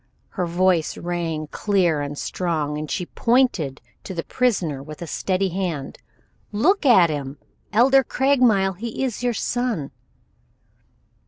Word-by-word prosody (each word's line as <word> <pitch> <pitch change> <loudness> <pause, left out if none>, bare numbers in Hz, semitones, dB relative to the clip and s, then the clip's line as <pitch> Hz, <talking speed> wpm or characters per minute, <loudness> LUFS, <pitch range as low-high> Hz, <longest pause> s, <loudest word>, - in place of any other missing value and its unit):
Her 180 -2 -3
voice 175 -1 +1
rang 170 -3 -3
clear 180 -7 +1
and 145 0 -5
strong, 155 -5 -2
and 155 -1 -5
she 180 - -2
pointed 230 - +1 0.2
to 190 - -7
the 165 - -3
prisoner 180 - 0
with 155 +4 -8
steady 190 +4 -1
hand. 175 -6 -4 0.5
"Look 305 - +2
at 185 -10 +6
him, 140 -1 -5 0.3
Elder 265 +5 +5
Craigmile; 245 -8 +2
he 230 +5 -4
is 250 -4 -2
your 245 -1 0
son." 235 - -2
185 Hz, 130 wpm, -22 LUFS, 155-235 Hz, 0.5 s, at